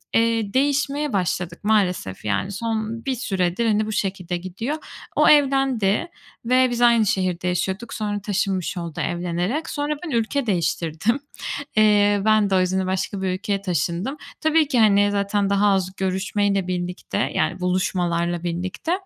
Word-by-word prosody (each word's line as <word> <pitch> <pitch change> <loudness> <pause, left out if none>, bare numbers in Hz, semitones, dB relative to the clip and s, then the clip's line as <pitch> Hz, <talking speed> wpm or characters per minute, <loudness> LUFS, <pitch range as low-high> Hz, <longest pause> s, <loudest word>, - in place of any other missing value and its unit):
eee, 225 -2 +2
değişmeye 285 +1 +1
başladık 180 -2 -2
maalesef 185 - 0
yani. 105 - -1
Son 225 +2 -3
bir 265 -1 0
süredir, 190 -3 -1
hani, 215 0 +2
bu 220 - -4
şekilde 190 -4 -2
gidiyor. 190 - -4 0.4
O - - +5
evlendi, 270 - +3 0.4
ve 255 +1 +4
biz 240 0 -2
aynı 235 -2 +5
şehirde 185 -2 0
yaşıyorduk. 190 +5 -2
Sonra 205 -1 -3
taşınmış 195 -2 -1
oldu 170 -3 -4
evlenerek. 175 - -2
Sonra 290 0 -1
ben - - -5
ülke 240 +3 0
değiştirdim. 170 - 0 0.6
Eee, 205 -1 +4
ben 215 -2 +4
de 190 - +2
o - - +4
yüzden 185 +1 0
başka 190 +1 -2
bir 190 - -1
ülkeye 200 +1 -2
taşındım. 180 - -2 0.2
Tabii 315 -1 +3
ki, 260 -4 +1
hani, 205 -2 +4
zaten 200 0 0
daha 200 +1 +3
az 190 -1 +1
görüşmeyle 195 0 0
birlikte, 180 0 -3 0.2
yani, - - 0
buluşmalarla 175 -2 0
birlikte. 180 - -3
200 Hz, 150 wpm, -22 LUFS, 180-230 Hz, 0.6 s, O